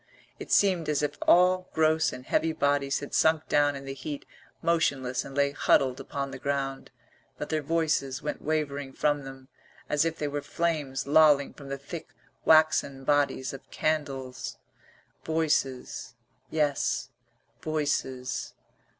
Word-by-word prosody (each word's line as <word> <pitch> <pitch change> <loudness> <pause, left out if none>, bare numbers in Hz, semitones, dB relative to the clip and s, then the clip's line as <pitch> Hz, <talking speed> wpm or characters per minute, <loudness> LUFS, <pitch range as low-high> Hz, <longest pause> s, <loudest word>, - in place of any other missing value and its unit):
It - - -8
seemed 185 -6 +3
as 150 -1 +1
if 145 0 -1
all 180 +1 +5
gross 160 0 +3
and 125 - -9
heavy 160 +3 +1
bodies 140 -2 +1
had 145 - -8
sunk 160 -1 +3
down 145 -1 +3
in 135 0 -8
the 135 - -5
heat 140 +2 -6 0.4
motionless 130 -7 +1
and 135 - -9
lay 140 0 +3
huddled 135 -2 +2
upon 140 0 -4
the - - -7
ground, 135 -1 -2 0.5
but - - -5
their 155 -1 0
voices 150 -4 0
went 150 - -4
wavering 145 -3 -2
from 145 -1 0
them 135 -1 -10 0.4
as 150 0 +2
if 165 0 -1
they 150 - -2
were 145 0 -3
flames 150 -5 -2
lolling 145 -1 +5
from 140 -2 -11
the 140 - -3
thick 155 +4 -9 0.3
waxen 155 -4 +4
bodies 145 -2 +1
of 135 - -11
candles. 135 -5 -2 0.7
Voices. 150 -6 -1 0.3
Yes, 150 -3 0 0.5
voices. 140 -4 -2
145 Hz, 140 wpm, -28 LUFS, 135-155 Hz, 0.7 s, all